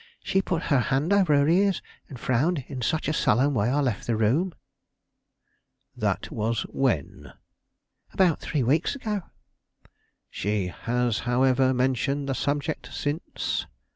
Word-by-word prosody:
She 190 - +1
put 170 -3 -2
her 140 - +5
hand 140 - +1
over 185 -7 +4
her 140 0 +3
ears 190 +3 +3 0.3
and 130 - -9
frowned 135 +5 0
in 130 -3 -6
such 155 +6 0
a 155 - +1
sullen 140 +1 +2
way 110 -2 +1
I 145 +3 +2
left 125 -7 -2
the 115 - +1
room." 135 - +1 1.4
"That - - -2
was 110 +1 -1
when?" 120 - -2 0.8
"About 180 -5 +3
three 145 -5 -1
weeks 150 - +1
ago." 215 -6 -3 1.1
"She 100 -2 -1
has, 120 +2 -1
however, 130 +1 +3
mentioned 130 +2 0
the 135 - 0
subject 145 +3 -2
since?" 145 +3 -3
135 Hz, 140 wpm, -26 LUFS, 120-160 Hz, 1.4 s, her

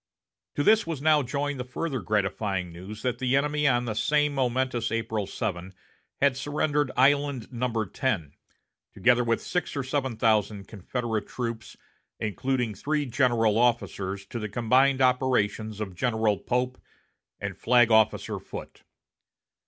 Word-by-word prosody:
To 145 - +1
this 220 +4 +4
was 165 -4 -3
now 150 +1 +4
joined 140 +1 -2
the - - -2
further 130 +2 -3
gratifying 100 -3 -1
news 100 +5 -9
that 125 -1 -1
the 130 0 +1
enemy 150 +1 +1
on 120 -2 +2
that 110 -2 -3
same 150 +2 +2
momentous 130 -2 0
April 110 -3 -2
7 95 -3 -4 0.4
had 140 -2 +3
surrendered 145 +1 0
Island 140 -1 +2
No. 120 -2 -1
10, 95 - -2 0.6
together 125 0 +4
with 115 -1 0
six 180 -4 -2
or 140 - -1
seven 130 -3 -2
thousand 105 -3 +1
Confederate 110 +1 -3
troops, 115 -3 -5 0.4
including 120 +2 -1
three 150 +8 -1
general 120 -4 +2
officers, 100 -5 0
to 120 - -6
the 110 -1 -4
combined 130 +5 +3
operations 110 -5 +1
of 100 -3 -4
General 110 +1 +1
Pope 125 +1 -2 0.6
and - - -4
Flag 120 -1 +4
Officer 110 -1 +3
Foote. - - -9
120 Hz, 140 wpm, -27 LUFS, 110-135 Hz, 0.6 s, this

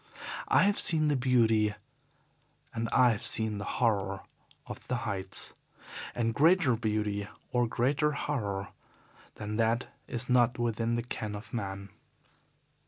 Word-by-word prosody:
I - - +5
have 205 +1 +3
seen 155 -2 +3
the 145 - +2
beauty 115 -5 +3 1.0
and 115 0 -2
I 125 -1 +5
have 105 - -3
seen 110 -2 0
the 100 - -5
horror 100 -5 +1 0.4
of - - -9
the - - 0
heights 95 -1 -2 0.6
and 115 -1 0
greater 155 -1 +4
beauty 105 -2 -1 0.2
or 120 -1 +2
greater 140 +6 +1
horror 100 -10 -2 0.7
than 105 +1 -4
that 115 +2 +1 0.2
is 120 +1 -4
not 125 -1 +3
within 115 0 0
the 120 - -1
ken 110 -3 -4
of 105 +3 -10
man. 100 -3 -4
115 Hz, 135 wpm, -30 LUFS, 105-125 Hz, 1.0 s, I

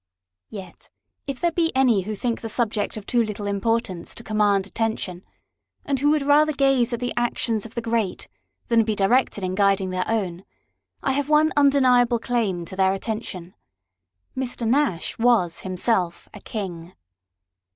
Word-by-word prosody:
Yet, 190 -4 -10 0.4
if 275 -2 -4
there 345 - +1
be 330 0 +1
any 250 -6 +4
who 210 +3 -4
think 235 +2 -2
the 225 - -5
subject 220 -2 -1
of 210 - -8
too 240 - +2
little 210 -2 -3
importance 200 -3 -1
to 235 - -10
command 205 -3 +2
attention, 200 -4 -3 0.6
and 275 -2 0
who 290 +2 +3
would 300 -1 +2
rather 300 +2 +4
gaze 270 -3 +2
at 235 - -2
the 245 0 -2
actions 230 -2 0
of 225 - -19
the 235 - -3
great, 225 -5 -1 0.4
than 230 -1 +4
be 215 -1 -1
directed 205 +1 +2
in 185 0 -1
guiding 195 -1 +2
their 185 0 -2
own, 190 -5 -2 0.6
I 270 - +1
have 285 +2 -1
one 305 +1 +4
undeniable 255 -4 +4
claim 220 -7 -1
to 190 - -9
their 190 0 +3
attention. 195 -4 -5 0.8
Mr. 250 -3 -3
Nash 250 - 0
was 225 -8 +2
himself 185 -1 -1
a 210 - -10
King. 180 -5 -6
225 Hz, 160 wpm, -23 LUFS, 195-250 Hz, 0.8 s, any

